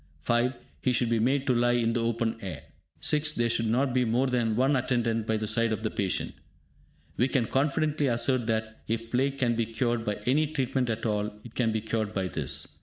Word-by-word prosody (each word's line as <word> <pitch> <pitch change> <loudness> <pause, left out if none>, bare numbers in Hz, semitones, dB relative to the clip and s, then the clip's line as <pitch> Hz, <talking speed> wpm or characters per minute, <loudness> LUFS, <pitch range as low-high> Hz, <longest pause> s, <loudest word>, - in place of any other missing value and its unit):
(5) 120 - +1 0.3
He 130 - +2
should 120 -1 +1
be 115 - +2
made 135 +4 +1
to 130 - +3
lie 120 0 +3
in 115 -1 +1
the 120 - 0
open 115 0 0
air. 85 -7 -6 0.4
(6) 155 -1 +1
There 120 -3 +1
should 115 -1 +1
not 125 +3 +1
be 125 0 +3
more 120 +3 +2
than 120 -4 +1
one 135 +4 +3
attendant 120 -3 0
by 110 - +1
the 110 - -2
side 115 +2 +2
of 110 0 -2
the 110 - -1
patient. 95 -2 -1 0.8
We 125 - +3
can 130 -3 +1
confidently 145 +3 +1
assert 120 0 +1
that, 110 -1 -2
if 115 +1 -3
plague 135 +2 +1
can 120 -4 +1
be 115 -1 0
cured 120 0 -1
by 105 -2 -1
any 150 +5 +3
treatment 130 -4 -1
at 115 +1 -2
all, 105 -1 0
it 120 - -11
can 115 -3 +1
be 110 0 -1
cured 110 -1 -2
by 95 -2 -1
this. 75 -7 -3
120 Hz, 220 wpm, -28 LUFS, 110-130 Hz, 0.8 s, to